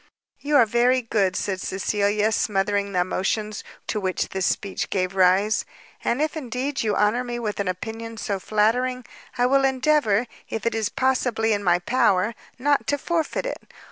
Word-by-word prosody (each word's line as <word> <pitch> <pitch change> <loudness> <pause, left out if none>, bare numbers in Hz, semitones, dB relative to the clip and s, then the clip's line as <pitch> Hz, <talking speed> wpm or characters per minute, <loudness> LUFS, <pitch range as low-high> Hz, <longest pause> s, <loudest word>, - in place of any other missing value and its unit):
"You 295 +1 -1
are 250 -5 +7
very 245 +3 +2
good," 200 -5 +1
said 190 -1 -2
Cecilia, 205 +2 0
smothering 200 -1 0
the 180 -2 +1
emotions 210 +4 -2 0.2
to 215 - -2
which 185 -2 -1
this 190 -1 -1
speech 200 -1 -2
gave 185 -1 -1
rise, 190 +3 +3 0.4
"and 260 +6 +1
if 310 - -2
indeed 270 0 -3
you 215 -2 0
honour 210 +4 +2
me 240 -1 -4
with 215 -4 -3
an 200 - -1
opinion 225 +5 -5
so 200 -3 -2
flattering, 240 +5 +1 0.3
I 245 - +3
will 270 +2 +3
endeavour, 260 -4 +2 0.2
if 225 -1 -4
it 230 - +1
is 220 -1 0
possibly 245 -4 +1
in 205 0 -1
my 175 -2 +4
power, 195 +1 +2 0.2
not 285 +2 +1
to 285 - +1
forfeit 330 - -1
it." - - -4
220 Hz, 170 wpm, -24 LUFS, 200-255 Hz, 0.4 s, are